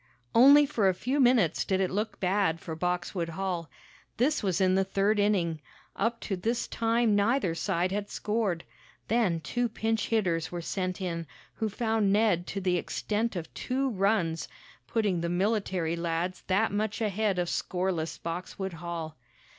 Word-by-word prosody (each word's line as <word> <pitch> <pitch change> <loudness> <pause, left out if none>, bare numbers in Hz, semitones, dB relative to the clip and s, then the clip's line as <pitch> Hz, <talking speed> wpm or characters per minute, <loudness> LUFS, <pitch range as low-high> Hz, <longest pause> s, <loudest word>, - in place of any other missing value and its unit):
Only 280 +5 +8
for 225 -9 +2
a 185 - 0
few 260 +9 -1
minutes 245 - +4
did 190 -1 0
it 190 -1 +1
look 210 +3 -2
bad 185 -3 +1
for 160 - -6
Boxwood 175 0 -2
Hall. 175 -1 -3 0.5
This 285 +6 +2
was 190 -4 0
in 185 -1 +3
the 190 +1 +3
third 200 +2 +1
inning. 175 -7 +1 0.3
Up 230 +3 0
to 195 - -2
this 230 +6 -1
time 230 -1 +2
neither 205 -2 +2
side 180 +1 0
had 205 +1 -2
scored. 210 -6 -1 0.5
Then 205 -8 +2
two 240 +9 -1
pinch 225 0 -1
hitters 175 -8 0
were 175 - -4
sent 185 +2 -3
in, 170 -3 -3 0.3
who 220 -1 -2
found 220 -1 +1
Ned 200 -4 +2
to 200 - -3
the 180 -2 +1
extent 215 +5 -2
of 165 -3 -5
two 265 +1 -1
runs, 195 -5 +1 0.4
putting 205 -7 0
the 170 - -1
military 185 -3 0
lads 170 +2 -2
that 200 +4 +2
much 210 +1 -1
ahead 210 -2 0
of 175 -1 0
scoreless 180 -2 -2
Boxwood 180 +3 -5
Hall. 165 -2 -6
195 Hz, 160 wpm, -29 LUFS, 175-220 Hz, 0.5 s, Only